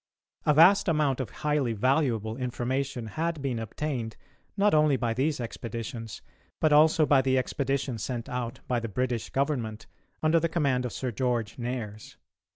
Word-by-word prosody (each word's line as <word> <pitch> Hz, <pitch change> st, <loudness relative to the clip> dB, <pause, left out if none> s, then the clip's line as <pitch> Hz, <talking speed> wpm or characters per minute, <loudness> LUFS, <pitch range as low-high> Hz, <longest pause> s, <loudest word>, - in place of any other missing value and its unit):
A 150 Hz, -, +5 dB
vast 180 Hz, +7 st, +6 dB
amount 150 Hz, -5 st, +2 dB
of 130 Hz, -5 st, -3 dB
highly 150 Hz, -5 st, 0 dB
valuable 115 Hz, -2 st, +1 dB
information 125 Hz, 0 st, -2 dB
had 160 Hz, +7 st, -2 dB
been 135 Hz, -4 st, -2 dB
obtained, 115 Hz, 0 st, -4 dB, 0.4 s
not 205 Hz, +1 st, +3 dB
only 150 Hz, -3 st, +4 dB
by 120 Hz, -2 st, -1 dB
these 140 Hz, +5 st, 0 dB
expeditions, 115 Hz, -1 st, -6 dB, 0.4 s
but 155 Hz, -1 st, +3 dB
also 155 Hz, +1 st, +5 dB
by 145 Hz, -2 st, +5 dB
the 130 Hz, 0 st, +2 dB
expedition 135 Hz, -1 st, -1 dB
sent 120 Hz, +1 st, -4 dB
out 125 Hz, -1 st, -4 dB
by 125 Hz, -1 st, +1 dB
the 115 Hz, 0 st, -5 dB
British 120 Hz, +1 st, -2 dB
Government 125 Hz, -6 st, -2 dB, 0.4 s
under 160 Hz, +1 st, +4 dB
the 165 Hz, +1 st, 0 dB
command 140 Hz, -6 st, +1 dB
of -, -, -8 dB
Sir 130 Hz, -2 st, -3 dB
George 120 Hz, -1 st, -1 dB
Nares. 110 Hz, -, -5 dB
130 Hz, 160 wpm, -28 LUFS, 115-150 Hz, 0.4 s, vast